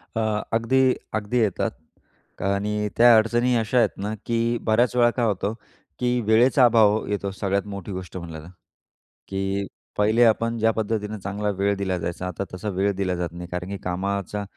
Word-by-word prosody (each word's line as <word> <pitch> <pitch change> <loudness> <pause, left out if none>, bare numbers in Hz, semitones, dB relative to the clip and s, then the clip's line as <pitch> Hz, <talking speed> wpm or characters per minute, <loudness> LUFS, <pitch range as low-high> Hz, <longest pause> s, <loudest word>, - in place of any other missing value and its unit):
अ, 110 -1 0
अगदी, 130 +3 +3 0.2
अगदी 110 +3 -1
येतात 105 -6 0 0.7
आणि 105 +2 0
त्या 120 0 +8
अडचणी 120 +3 +2
अशा 115 +2 0
आहेत 120 - +5
ना, 105 +2 -3
की 115 0 0
बऱ्याचवेळा 120 +1 +3
काय 120 0 0
होतं? 105 0 -1 0.5
की 125 0 +1
वेळेचा 120 +5 +4
अभाव 110 -2 +4
येतो 100 -1 -2
सगळ्यात 100 0 -1
मोठी 100 -1 -7
गोष्ट 95 -1 -6
म्हणलं 85 -3 -7
तर. - - -12 0.8
की 95 0 -2 0.3
पहिले 110 +3 +4
आपण 115 +1 +2
ज्या 115 +1 +3
पद्धतीनं 110 -1 -3
चांगला 100 +2 -3
वेळ 100 +1 +1
दिल्या 95 -2 -1
जायचा, 85 +2 -4
आता 90 +2 -4
तसा 105 +3 -4
वेळ 100 +1 +1
दिल्या 95 -2 -1
जात 85 -1 -2
नाही. 90 0 -7
कारण 90 +1 -5
की 100 - -4
कामाचा 100 +2 -2
105 Hz, 170 wpm, -24 LUFS, 100-115 Hz, 0.8 s, त्या